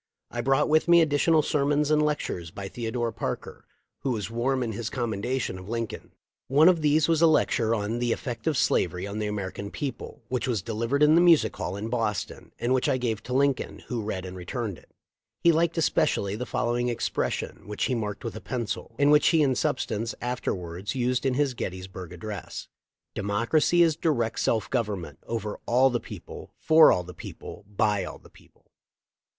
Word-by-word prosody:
I 120 - -2
brought 135 +4 +2
with 155 +2 +3
me 170 0 +7
additional 155 +1 +3
sermons 145 0 +1
and 150 0 +4
lectures 145 - -2
by 100 +3 -7
Theodore 115 +2 -3
Parker, - - -5 0.3
who 135 - -2
was 110 -3 -2
warm 125 +3 0
in 115 - -2
his 110 +2 -4
commendation 120 -3 -2
of 95 +2 -11
Lincoln. 115 -1 -4 0.3
One 145 +5 +5
of 175 -3 +5
these 150 0 +3
was 165 -1 +2
a 165 - +7
lecture 115 -7 +2
on 110 +2 -2
"The 120 -1 0
Effect 120 +2 -4
of 155 -4 +2
Slavery 90 -3 +1
on 100 +2 -5
the 105 - -1
American 100 -1 -4
People," 135 -3 -6
which 125 0 -2
was 115 -7 -1
delivered 115 +6 0
in 150 +1 +6
the 170 - +6
Music 170 -3 +5
Hall 90 - -4
in 105 +2 -4
Boston, 115 -5 -3
and 120 +2 0
which 130 +3 +1
I 135 - +2
gave 115 -4 -2
to 125 - -6
Lincoln, 140 0 0
who 120 -3 -2
read 95 -3 -4
and 90 0 -7
returned 95 - -4
it. - - -24 0.5
He 170 - +5
liked 165 +1 +1
especially 140 -10 +1
the 125 +3 -5
following 120 +1 0
expression, 120 - -2
which 105 0 -3
he 130 - +1
marked 105 -2 -3
with 115 - -4
a 110 - -7
pencil, 120 -2 -4
and 145 +2 +4
which 150 0 +5
he 160 -3 +4
in 135 -2 +3
substance 115 -2 -1
afterwards 95 -5 -3
used 125 +1 0
in 130 - +1
his 140 -1 +1
Gettysburg 95 -4 -6
address: 95 +2 -7 0.5
''De - - -4
mocracy 115 - +3
is 160 -2 +3
direct 120 -9 0
self 110 -2 +1
government, 100 - -2
over 110 -2 -3
all 130 +3 +4
the 120 - 0
people, - - -10
for 160 0 +7
all 90 - +1
the 90 +1 -10
people, 80 - -10
by 105 -1 +1
all - - -7
the - - -19
people." - - -23
120 Hz, 195 wpm, -26 LUFS, 105-140 Hz, 0.5 s, me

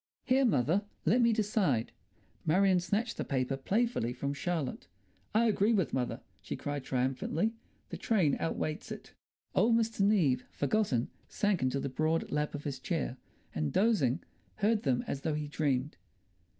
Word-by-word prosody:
"Here, 265 +1 +3
mother, 190 - +2 0.2
let 220 +10 +4
me 235 -1 +5
decide." 205 - +1 0.5
Marion 185 +3 +4
snatched 205 +7 -1
the - - -1
paper 130 0 -1
playfully 195 - 0
from 140 +3 -3
Charlotte. 155 -3 -3 0.5
"I 230 +2 +5
agree 215 0 +3
with 190 -7 +1
mother," 125 -2 -1 0.2
she - - -5
cried 145 -1 -4
triumphantly. 135 - 0 0.4
"The - - -5
train 185 -11 +2
overweights 155 -1 -3
it." - - -8 0.4
Old 230 0 +4
Mr. 225 -1 0
Neave, 170 -12 +3
forgotten, 140 - 0 0.2
sank 205 -3 0
into 130 +1 +1
the - - -2
broad 155 +4 0
lap 150 0 -1
of 145 - -6
his 135 -3 -4
chair, 60 - -2 0.4
and, 75 -2 -1
dozing, 180 - +2 0.3
heard 215 +1 +2
them 130 -4 +1
as 135 - -4
though 155 0 -1
he 150 0 -3
dreamed. 145 -2 -1
155 Hz, 155 wpm, -31 LUFS, 135-210 Hz, 0.5 s, me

